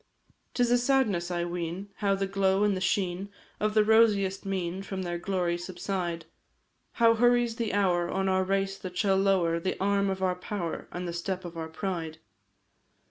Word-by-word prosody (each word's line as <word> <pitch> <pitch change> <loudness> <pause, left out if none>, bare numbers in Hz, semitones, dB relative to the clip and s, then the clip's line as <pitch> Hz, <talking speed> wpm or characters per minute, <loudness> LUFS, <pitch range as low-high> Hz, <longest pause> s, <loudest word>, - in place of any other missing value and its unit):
'Tis 245 -1 +2
a 245 - +5
sadness 240 -9 +1
I 175 -1 -1
ween, 175 +3 -4
how 200 -2 +1
the 195 0 -1
glow 195 0 +1
and 205 -2 +2
the 185 - -4
sheen 190 +1 -1 0.3
Of 215 0 0
the 215 - +6
rosiest 210 -3 +3
mien 185 -1 -2
from 195 -1 -5
their 175 -1 -3
glory 175 -2 -1
subside; 175 -2 -4 0.7
How 230 -1 +5
hurries 240 0 +3
the 230 -3 -1
hour 175 -4 +2
on 195 0 -1
our 190 0 +2
race, 195 0 -1
that 180 -1 -7
shall 195 -2 +3
lower 185 -4 +2
The 185 +2 -3
arm 200 0 +2
of 190 0 -2
our 185 -1 +2
power, 180 -2 -4
and 180 0 -4
the 170 - -4
step 185 +2 -3
of 175 -1 -8
our 160 -1 -5
pride. 165 -2 -4
190 Hz, 185 wpm, -28 LUFS, 175-200 Hz, 0.7 s, the